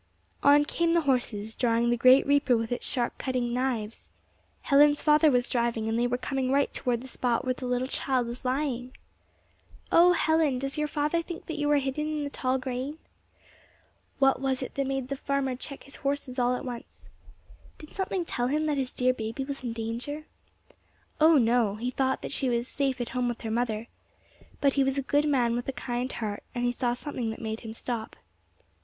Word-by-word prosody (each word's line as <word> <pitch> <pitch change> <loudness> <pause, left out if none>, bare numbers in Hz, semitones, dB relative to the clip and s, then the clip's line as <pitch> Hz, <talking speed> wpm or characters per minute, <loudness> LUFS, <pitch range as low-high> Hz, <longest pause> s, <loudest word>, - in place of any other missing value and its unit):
On 290 +1 +6
came 335 +2 +1
the 340 - +4
horses, 235 -6 -1
drawing 235 -1 +2
the - - +3
great 255 +3 +6
reaper 280 -4 +3
with 225 0 -3
its 245 - -1
sharp 240 -2 -1
cutting 250 -2 -1
knives. 240 -4 -2 0.5
Helen's 290 +1 +5
father 305 +1 +5
was 245 -2 +2
driving, 235 -3 0
and 225 - 0
they 245 - +2
were 245 0 0
coming 260 0 -2
right 280 +1 +2
toward 240 -2 -1
the 260 - -9
spot 245 -1 -1
where 255 - +1
the 250 0 -6
little 250 +1 0
child 260 -2 0
was 235 +2 -6
lying! 255 -1 -2 0.9
Oh, 355 +1 +7
Helen, 315 -4 +2
little - - -3
does 275 0 -2
your 300 - +1
father 300 +3 0
think 335 0 -8
that 315 -2 -5
you 295 0 +1
are 295 - +5
hidden 275 +2 -1
there 310 - -2
in 295 - -2
the 285 - -4
tall 260 -1 0
grain! 260 +3 -4 1.2
What 270 -1 +3
was 265 -1 0
it - - -7
that 275 -1 -1
made 270 -1 -2
the 275 - -2
farmer 275 -1 -1
check 275 +2 -8
his 275 - -10
horses 275 -2 -2
all 245 0 +2
at 260 - -6
once? 240 -2 -8 0.7
Did 305 - -12
something 380 -2 -2
tell 245 -6 -1
him 305 +4 0
that 295 -2 0
his 260 -1 -2
dear 255 0 +2
baby 225 +3 -4
was 275 -1 -6
in 240 - -2
danger? 235 +7 -4 0.9
Oh, 315 0 +6
no! 230 -4 +3
he 240 +4 -3
thought 265 +1 0
that - - -4
she 265 - 0
was 235 0 0
safe 270 -2 -1
at 240 - -3
home 250 0 -1
with 240 - -5
her 225 - -4
mother. 225 -1 -1 0.8
But 280 -1 +4
he 275 - +3
was 270 +1 +1
a 275 - 0
good 290 +3 +2
man 240 -4 +2
with 245 - -3
a - - 0
kind 245 0 -3
heart, 210 -3 -4
and 245 0 0
he 245 - +2
saw 245 0 -1
something 250 -3 -4
that 220 - -5
made 220 0 -4
him 220 -2 -8
stop. 230 -1 -4
255 Hz, 210 wpm, -28 LUFS, 240-280 Hz, 1.2 s, Oh